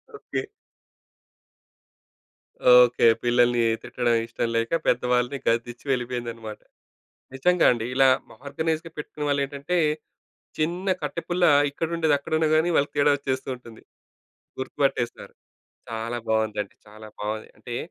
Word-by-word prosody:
Okay. 415 Hz, -2 st, -4 dB, 2.4 s
Okay. 120 Hz, -1 st, +2 dB, 0.2 s
పిల్లల్ని, 120 Hz, 0 st, +3 dB, 0.2 s
తిట్టడం 120 Hz, -1 st, 0 dB
ఇష్టం 115 Hz, 0 st, -2 dB
లేక, 115 Hz, 0 st, 0 dB, 0.2 s
పెద్దవాళ్ళని 125 Hz, +2 st, +1 dB
గదిచ్చి 120 Hz, +2 st, -1 dB
వెళ్ళిపోయిందనమాట. 120 Hz, -3 st, -4 dB, 0.8 s
నిజంగా 180 Hz, +6 st, +3 dB
అండి. 115 Hz, -2 st, -2 dB
ఇలా, 135 Hz, +1 st, +5 dB, 0.4 s
ఆర్గనైజ్‌గా 160 Hz, +3 st, -2 dB
పెట్టుకున్న 150 Hz, 0 st, -5 dB
వాళ్ళు 140 Hz, 0 st, +1 dB
ఏంటంటే, 140 Hz, +5 st, -3 dB, 0.8 s
చిన్న 175 Hz, +5 st, -1 dB
కట్టెపుల్ల, 175 Hz, +1 st, -1 dB, 0.3 s
ఇక్కడుండేది 160 Hz, +1 st, 0 dB
అక్కడున్నాగాని, 155 Hz, +3 st, +1 dB
వాళ్ళకి 145 Hz, -, +1 dB
తేడా 145 Hz, 0 st, +5 dB
వచ్చేస్తూ 135 Hz, -2 st, -3 dB
ఉంటుంది. 115 Hz, -3 st, -14 dB, 0.8 s
గుర్తు 130 Hz, 0 st, -6 dB
పట్టేస్తారు. 120 Hz, -3 st, -1 dB, 0.6 s
చాలా 115 Hz, +1 st, -3 dB
బాగుందండి. 110 Hz, -2 st, -1 dB
చాలా 110 Hz, +1 st, -12 dB
బాగుంది 110 Hz, +1 st, -4 dB
అంటే, 120 Hz, +2 st, -7 dB
125 Hz, 105 wpm, -25 LUFS, 115-155 Hz, 2.4 s, ఇలా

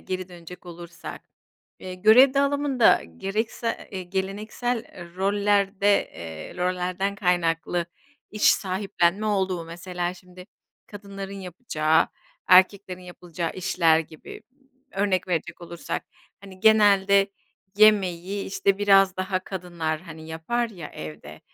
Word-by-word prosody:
geri 185 Hz, 0 st, -5 dB
dönecek 175 Hz, +1 st, -12 dB
olursak. 170 Hz, 0 st, -9 dB, 0.6 s
Eee, 185 Hz, 0 st, -7 dB
görev 225 Hz, +8 st, +6 dB
dağılımında 280 Hz, -3 st, +3 dB, 0.2 s
gereksa 220 Hz, +3 st, -2 dB, 0.2 s
eee, 190 Hz, -1 st, -4 dB
geleneksel 205 Hz, +6 st, -3 dB, 0.3 s
rollerde, 200 Hz, 0 st, +2 dB
eee, 80 Hz, -2 st, -8 dB
rollerden 180 Hz, +2 st, -1 dB
kaynaklı 175 Hz, -2 st, 0 dB, 0.4 s
iş 210 Hz, -, -7 dB
sahiplenme 190 Hz, 0 st, 0 dB
olduğu 190 Hz, -4 st, 0 dB
mesela 175 Hz, +1 st, -4 dB
şimdi 180 Hz, 0 st, -15 dB, 0.4 s
kadınların 200 Hz, -1 st, -8 dB
yapacağı, 160 Hz, -4 st, 0 dB, 0.4 s
erkeklerin 185 Hz, 0 st, +4 dB
yapılacağı 175 Hz, -2 st, -6 dB
işler 170 Hz, -3 st, +2 dB
gibi. 160 Hz, +5 st, -11 dB, 0.5 s
Örnek 190 Hz, -2 st, 0 dB
verecek 175 Hz, 0 st, -3 dB
olursak, 170 Hz, 0 st, -5 dB, 0.4 s
hani, 190 Hz, -2 st, -13 dB
genelde 200 Hz, -2 st, +5 dB, 0.5 s
yemeği, 205 Hz, -5 st, +5 dB
iii, 195 Hz, +2 st, -4 dB
işte, 195 Hz, 0 st, 0 dB
biraz 195 Hz, -2 st, +4 dB
daha 185 Hz, 0 st, -1 dB
kadınlar, 170 Hz, -4 st, -4 dB
hani, 160 Hz, -2 st, -11 dB
yapar 230 Hz, +10 st, -2 dB
ya 175 Hz, -7 st, -9 dB
evde. 75 Hz, -1 st, -10 dB
185 Hz, 110 wpm, -25 LUFS, 175-200 Hz, 0.6 s, görev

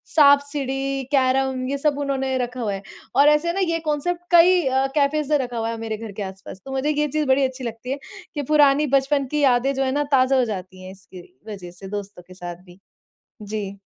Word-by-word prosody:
साँप-सीढ़ी, 280 Hz, -2 st, +3 dB
carrom 265 Hz, -1 st, +1 dB
ये 280 Hz, -, -1 dB
सब 290 Hz, 0 st, 0 dB
उन्होंने 270 Hz, -2 st, -1 dB
रखा 250 Hz, 0 st, -3 dB
हुआ 210 Hz, -3 st, -1 dB
है 195 Hz, -, -5 dB, 0.3 s
और 285 Hz, +1 st, +6 dB
ऐसे 300 Hz, +3 st, +2 dB
है 340 Hz, -, 0 dB
ना 390 Hz, -, -2 dB
ये 330 Hz, -, 0 dB
कांसेप्ट 320 Hz, +4 st, -1 dB
कई 350 Hz, +1 st, +6 dB
अ, 265 Hz, +1 st, +2 dB
कैफेस 295 Hz, 0 st, +1 dB
से 300 Hz, -, +4 dB
रखा 245 Hz, -3 st, -4 dB
हुआ 225 Hz, 0 st, -1 dB
है 230 Hz, -, -4 dB
मेरे 225 Hz, -1 st, -4 dB
घर 225 Hz, -1 st, -8 dB
के 200 Hz, +1 st, -5 dB
आस-पास। 190 Hz, 0 st, -9 dB
तो 270 Hz, -, -7 dB
मुझे 270 Hz, +2 st, -1 dB
ये 300 Hz, 0 st, +1 dB
चीज़ 305 Hz, +1 st, -1 dB
बड़ी 265 Hz, +1 st, +3 dB
अच्छी 260 Hz, 0 st, -5 dB
लगती 235 Hz, +2 st, -5 dB
है 275 Hz, -, -1 dB, 0.4 s
कि 290 Hz, -, -1 dB
पुरानी 295 Hz, 0 st, +5 dB
बचपन 275 Hz, +1 st, +2 dB
की 300 Hz, -, 0 dB
यादें 260 Hz, 0 st, +3 dB
जो 270 Hz, 0 st, -1 dB
है 260 Hz, -, 0 dB
ना, 290 Hz, +2 st, 0 dB
ताज़ा 265 Hz, 0 st, +4 dB
हो 255 Hz, -, +3 dB
जाती 185 Hz, -3 st, -7 dB
है 185 Hz, -, -8 dB
इसकी 190 Hz, -1 st, -12 dB, 0.3 s
वज़ह 190 Hz, -5 st, -8 dB
से 180 Hz, +2 st, -9 dB
दोस्तों 200 Hz, -2 st, -8 dB
के 185 Hz, -, -13 dB
साथ 175 Hz, -1 st, -8 dB
भी। 180 Hz, 0 st, -17 dB, 0.6 s
जी। 205 Hz, -1 st, -5 dB
265 Hz, 230 wpm, -22 LUFS, 215-285 Hz, 0.6 s, और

